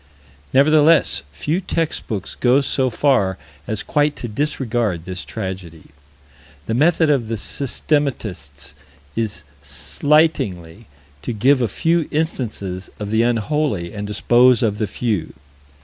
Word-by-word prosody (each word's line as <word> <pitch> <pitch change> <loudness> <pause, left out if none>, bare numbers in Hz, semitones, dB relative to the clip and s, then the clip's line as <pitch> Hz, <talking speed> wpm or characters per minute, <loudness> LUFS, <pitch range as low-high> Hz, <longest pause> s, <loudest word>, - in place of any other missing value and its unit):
Nevertheless 155 +4 +4
few 150 - -2
text 165 -3 -2
books 100 -4 -4
go 130 +3 +3
so 130 -1 0
far 115 -7 +2 0.3
as 110 -2 -2
quite 150 0 +1
to 120 - -5
disregard 115 - -1
this 95 0 -5
tragedy. 95 -7 -7 0.7
The 110 - -2
method 155 +4 +3
of 130 -6 +1
the 115 - -2
systematists 105 - -2 0.4
is 110 -3 -2 0.2
slightingly 105 - 0 0.3
to 120 - -4
give 130 +5 +3
a 120 - +2
few 165 - +1
instances 110 - -3
of 105 -1 -4
the 110 +1 +3
unholy, 115 - 0
and 105 -1 -5
dispose 120 +4 +4
of 105 -2 0
the 110 - 0
few. 110 -7 -2
115 Hz, 125 wpm, -20 LUFS, 100-145 Hz, 0.7 s, Nevertheless